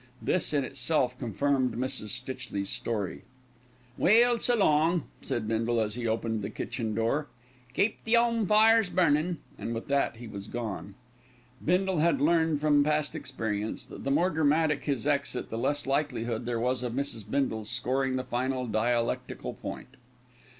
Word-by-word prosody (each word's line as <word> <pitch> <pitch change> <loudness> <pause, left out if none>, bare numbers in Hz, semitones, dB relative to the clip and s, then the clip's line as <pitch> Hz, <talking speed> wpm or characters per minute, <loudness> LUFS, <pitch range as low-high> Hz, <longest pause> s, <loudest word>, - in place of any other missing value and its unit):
This 180 - 0
in 145 -2 +1
itself 130 -1 0
confirmed 130 +2 0
Mrs. 130 -3 -2
Stitchley's 120 -4 -4
story. 105 -5 -3 0.8
"Well, 235 +4 +5
s'long," 170 - +3 0.2
said 110 -2 -3
Bindle, 115 +1 +1
as 105 -1 0
he 120 0 -2
opened 110 0 -1
the 100 - -3
kitchen 110 0 -4
door. 115 +7 0 0.5
"Keep 210 +2 +1
the 230 +1 +3
'ome 230 -3 +2
fires 220 -1 +5
burnin'," 170 -1 +2 0.2
and 115 - -3
with 115 - -5
that 140 -3 +1
he 120 +1 -9
was 100 -1 -7
gone. 110 -4 -5 0.7
Bindle 185 +1 +2
had 170 +2 +3
learned 160 0 +3
from 145 -1 +4
past 150 0 0
experience 110 -8 -3
that - - -10
the 135 - -1
more 175 +7 +3
dramatic 155 -1 +2
his 140 -4 -1
exit 140 -3 -1
the 110 - -3
less 145 +4 -1
likelihood 125 -5 -1
there 120 -1 -1
was 125 +1 0
of 125 -2 -3
Mrs. 130 -4 -2
Bindle 110 -5 0
scoring 130 +4 0
the 130 - -1
final 130 +1 -1
dialectical 120 +2 -1
point. 130 - -8
130 Hz, 155 wpm, -29 LUFS, 115-155 Hz, 0.8 s, Well